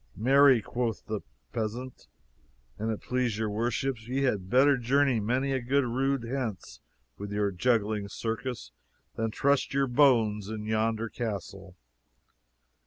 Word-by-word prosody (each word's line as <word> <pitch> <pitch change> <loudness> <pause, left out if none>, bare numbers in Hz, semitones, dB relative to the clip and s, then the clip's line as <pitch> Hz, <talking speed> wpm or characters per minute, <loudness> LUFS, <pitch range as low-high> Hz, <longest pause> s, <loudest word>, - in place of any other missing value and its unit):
"Marry," 130 0 +5
quoth 120 -2 -3
the 110 -2 -3 0.3
peasant, 120 +4 -5 0.7
"an' 110 +2 -2
it 110 - -3
please 125 -4 -1
your 110 -1 -1
worships, 120 +2 -2
ye 135 +2 -1
had 100 -8 0
better 135 +4 +5
journey 135 0 +2
many 125 +6 0
a 130 -1 0
good 135 +3 +1
rood 135 +2 0
hence 115 - -4 0.4
with 100 0 -6
your 105 -1 0
juggling 105 +1 0
circus 115 - -4 0.4
than 115 0 -1
trust 140 +4 +1
your 140 0 +3
bones 115 -6 +3
in 110 -1 -5
yonder 110 +1 0
castle." 100 -5 -6
115 Hz, 135 wpm, -28 LUFS, 105-130 Hz, 0.7 s, Marry